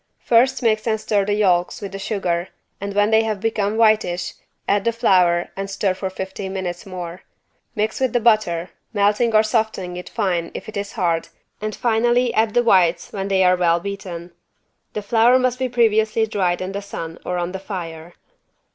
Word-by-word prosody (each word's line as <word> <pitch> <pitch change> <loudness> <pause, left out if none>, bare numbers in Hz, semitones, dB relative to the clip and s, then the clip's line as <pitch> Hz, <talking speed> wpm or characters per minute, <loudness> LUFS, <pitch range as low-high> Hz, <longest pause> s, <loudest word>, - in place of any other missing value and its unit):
First 255 +3 +3
mix 220 -1 +1
and 220 -1 +1
stir 205 -2 0
the 205 0 0
yolks 180 -4 +2
with 200 -2 -6
the 195 - -6
sugar 185 -4 -1 0.3
and 200 0 -4
when 205 +1 +3
they 220 0 +5
have 215 -2 -2
become 215 -1 -1
whitish, 215 -6 +2 0.3
add 200 -1 +2
the 230 - +2
flour 180 -7 +3
and 195 0 -4
stir 195 -1 0
for 190 +1 -4
fifteen 190 0 -6
minutes 180 -1 -4
more. 180 -1 -7 0.5
Mix 215 0 -1
with 260 -2 +1
the 245 - +2
butter, 215 -7 +2 0.2
melting 210 +3 +2
or 215 - +6
softening 215 -5 -1
it 180 - -8
fine 180 -6 -1
if - - -7
it 215 - -8
is 200 +1 -4
hard 170 -6 0 0.3
and 215 0 -3
finally 240 +1 +2
add 220 -1 +1
the 240 - +4
whites 180 -6 +3
when 195 -1 -3
they 190 -1 +3
are 180 0 +5
well 170 -1 +2
beaten. 180 -2 -6 0.6
The 210 - -4
flour 230 +4 +4
must 255 -1 0
be 260 -1 -1
previously 220 -2 +2
dried 185 -5 -1
in 185 +1 -3
the 200 +1 -4
sun 165 -5 -7
or 180 - -2
on 175 0 -2
the 190 - -5
fire. 175 -4 -7
200 Hz, 190 wpm, -21 LUFS, 180-220 Hz, 0.6 s, or